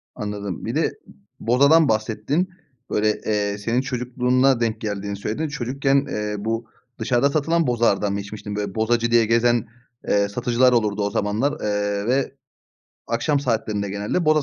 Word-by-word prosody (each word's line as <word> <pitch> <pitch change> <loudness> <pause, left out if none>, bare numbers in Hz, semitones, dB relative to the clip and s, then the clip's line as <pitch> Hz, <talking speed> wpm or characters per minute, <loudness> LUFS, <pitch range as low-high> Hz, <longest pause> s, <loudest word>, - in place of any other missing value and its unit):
Anladım 100 -3 -5
bir - - -3
de - - +2
ı - - -5 0.5
bozadan 140 +6 +4
bahsettin, 110 - 0 0.4
böyle, 105 0 +1
eee, 105 -1 0
senin 115 +4 0
çocukluğuna 125 0 +1
denk 110 -2 -1
geldiğini 100 -1 -3
söyledin, 110 +10 -3
çocukken, 140 0 0
eee, 105 0 -2
bu 115 +2 -2 0.3
dışarıda 120 +4 +2
satılan 160 +2 +1
bozalardan 110 -4 +2
mı 100 - -2
içmiştin? 105 0 -7
Böyle, 100 -2 -3
bozacı 115 +1 +1
diye 115 -1 +5
gezen, 115 +1 +2 0.4
eee, 100 0 +2
satıcılar 125 +3 +2
olurdu 105 -3 +1
o 100 - 0
zamanlar, 105 +9 0
eee, 105 -1 -1
ve 130 +3 0 0.7
akşam 135 +5 0
saatlerinde 110 -6 -1
genelde 105 - -1
boza 155 -1 +4
115 Hz, 150 wpm, -22 LUFS, 105-130 Hz, 0.7 s, diye